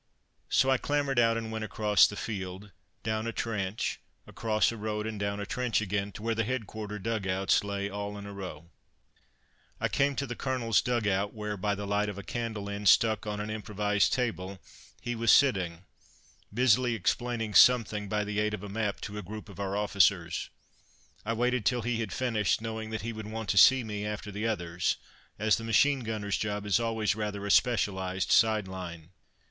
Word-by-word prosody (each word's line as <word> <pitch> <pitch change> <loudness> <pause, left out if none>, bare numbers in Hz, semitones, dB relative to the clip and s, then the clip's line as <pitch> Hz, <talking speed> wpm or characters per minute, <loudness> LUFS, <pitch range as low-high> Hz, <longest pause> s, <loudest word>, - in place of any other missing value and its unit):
So 135 - +3
I 130 - +3
clambered 145 -3 0
out 115 -1 +4
and 115 -1 -4
went 110 0 -3
across 105 -1 +4
the 105 - -7
field, 100 -2 -5 0.3
down 110 +1 -1
a - - -1
trench, 105 -3 -2 0.3
across 110 0 +1
a - - -6
road 105 -1 -3
and 110 -2 -4
down 100 0 -2
a 100 - -3
trench 125 +1 0
again 100 -1 -2
to 105 - -9
where 115 0 +1
the 115 0 0
headquarter 110 -3 -4
dug 110 -1 -2
outs 95 +2 +2
lay 100 -1 -2
all 100 0 -5
in 100 - -8
a 100 - -8
row. 85 -4 -8 1.1
I - - 0
came 140 0 +1
to 140 - -1
the 120 -2 -5
Colonel's 120 -5 +1
dug 120 -3 0
out, 100 +2 0
where, 105 -1 -3
by 105 +1 -1
the 100 +1 -5
light 105 +1 0
of 100 - -6
a 100 - -6
candle 110 -2 -4
end 100 -1 +1
stuck 110 -1 +4
on 105 0 -3
an 105 +1 -4
improvised 105 -1 0
table, 100 -6 -2 0.4
he 120 - -3
was 115 -1 +3
sitting, 95 -11 +3 0.7
busily 125 +1 +3
explaining 115 +2 -1
something 105 -2 +5
by 105 0 0
the 105 0 -2
aid 105 0 +1
of 105 - -11
a 105 - -6
map 105 0 -2
to 105 +1 -5
a - - -4
group 105 +3 -8
of - - -12
our 100 0 -2
officers. 100 -5 +2 0.8
I 115 - +1
waited 125 +1 +1
till 120 +3 +1
he 120 0 -1
had 110 -4 -3
finished, 115 -6 +1
knowing 110 0 -5
that 110 -2 -4
he 115 +1 -3
would 110 -1 -7
want 110 -2 -5
to 100 - +1
see 130 +3 +7
me 105 -2 -4
after 105 0 -4
the 105 +3 -2
others, 90 -5 -1 0.4
as 110 +1 +3
the 115 - -6
machine 135 +5 +3
gunner's 110 -4 -2
job 105 -1 -2
is 105 +1 +3
always 110 -4 0
rather 105 -2 -3
a 100 - 0
specialized 95 -6 +1
side 110 -3 +4
line. 85 -3 -8
105 Hz, 200 wpm, -29 LUFS, 100-115 Hz, 1.1 s, see